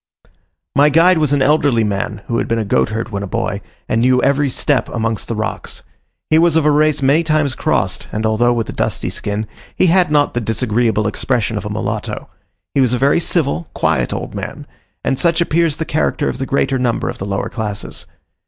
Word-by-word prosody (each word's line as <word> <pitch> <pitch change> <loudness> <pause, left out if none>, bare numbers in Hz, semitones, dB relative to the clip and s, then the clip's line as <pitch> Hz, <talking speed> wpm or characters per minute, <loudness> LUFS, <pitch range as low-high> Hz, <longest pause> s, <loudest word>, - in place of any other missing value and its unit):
My 145 +2 +5
guide 165 +3 +5
was 150 -3 +1
an 140 -2 +3
elderly 140 -5 +3
man, 100 -2 -3
who 115 - -1
had - - -2
been 115 - 0
a 110 - -1
goatherd 110 +3 0
when 100 -3 -4
a 100 - -4
boy, - - -2 0.3
and 115 - +1
knew 125 +1 +4
every 140 0 +2
step 135 +2 0
amongst 115 -2 -2
the 115 - -3
rocks. 110 0 -4 0.5
He 155 - +6
was 170 -1 +3
of 160 -2 +3
a 150 - +5
race 150 -1 +2
many 145 +5 +4
times 155 -4 +1
crossed, - - -1
and 110 +1 -2
although 110 +3 +2
with 115 -2 -1
a - - -4
dusky - - -2
skin, 105 +1 -3 0.3
he - - +3
had 185 -4 +4
not 145 -1 +2
the 120 - -1
disagreeable 115 -1 0
expression 115 +1 -1
of - - -3
a - - -5
mulatto. - - -4 0.5
He 140 - +3
was 125 -2 +2
a - - +2
very 140 +5 +3
civil, 165 -1 -1
quiet - - +1
old - - -4
man, - - -6 0.4
and 135 - 0
such 170 -1 +2
appears 165 -2 +1
the 160 - -2
character 150 -1 0
of - - -5
the 135 - -3
greater 135 -1 +1
number 120 -2 0
of - - -5
the 95 - -4
lower 100 -1 -2
classes. 105 -3 -5
130 Hz, 210 wpm, -17 LUFS, 115-150 Hz, 0.5 s, He